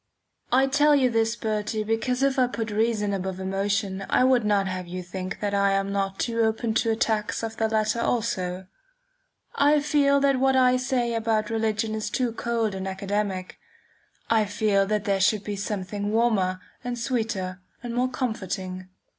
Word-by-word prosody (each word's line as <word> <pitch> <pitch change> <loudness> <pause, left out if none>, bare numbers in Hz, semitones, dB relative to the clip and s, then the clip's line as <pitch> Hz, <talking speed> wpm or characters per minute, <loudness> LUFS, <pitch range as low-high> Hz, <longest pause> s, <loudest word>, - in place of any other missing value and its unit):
I 260 +2 +5
tell 290 +2 +4
you 260 -3 +3
this, 225 0 +1
Bertie, 215 -1 -2
because 235 +4 0
if 275 -1 +2
I 250 - +4
put 225 -3 -4
reason 210 -1 0
above 190 -1 -3
emotion 195 0 -1
I - - +3
would 255 -2 +4
not 205 -2 +2
have 185 -1 -4
you 180 +1 -5
think 185 +1 -6
that 205 -1 -1
I 200 0 +3
am 195 0 0
not 195 +2 -1
open 230 0 0
to 225 +1 +1
attacks 220 -1 0
of 225 0 -4
the 220 -1 +1
latter 220 +1 +1
also. 190 -6 -1 0.9
I 295 +1 +4
feel 285 -1 +3
that 275 -2 +3
what 265 0 +3
I 255 -1 +5
say 250 -2 0
about 225 -1 0
religion 220 0 0
is 215 -1 -3
too 245 +1 0
cold 230 -2 -1
and 190 0 -4
academic. 195 -1 -3 0.7
I 220 -2 +3
feel 205 -1 +1
that 210 0 0
there 195 -1 +1
should 205 +2 +3
be 205 - -4
something 200 0 -3
warmer 210 -5 +1 0.2
and 245 -1 -3
sweeter 220 -7 -2 0.2
and 240 -1 -4
more 250 +2 +1
comforting. 190 -7 -4
220 Hz, 170 wpm, -25 LUFS, 195-235 Hz, 0.9 s, I